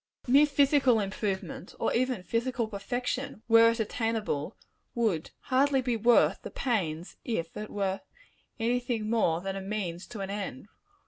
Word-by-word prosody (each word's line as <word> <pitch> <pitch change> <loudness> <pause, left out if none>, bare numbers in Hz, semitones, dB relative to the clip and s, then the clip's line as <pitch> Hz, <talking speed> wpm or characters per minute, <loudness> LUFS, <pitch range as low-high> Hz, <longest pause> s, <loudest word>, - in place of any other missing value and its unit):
Mere 280 +4 +6
physical 280 -4 +4
improvement 200 +5 -3
or - - +1
even 250 -5 0
physical 235 +2 -1
perfection, 245 +4 -3
were 230 0 +7
it 230 +1 -1
attainable 220 -7 -2 0.4
would 210 -9 0
hardly 270 +1 +2
be 245 -2 0
worth 230 +2 +4
the - - -7
pains, 180 - -2
if 170 -9 -3
it 210 0 -5
were 195 -1 -2 0.6
any 240 +2 +1
thing 230 -3 -2
more 175 -8 +2
than 195 +1 -3
a 195 - -4
means 190 -3 -4
to 220 -4 -7
an 195 0 -4
end. 200 -7 -5
225 Hz, 150 wpm, -29 LUFS, 195-245 Hz, 0.6 s, were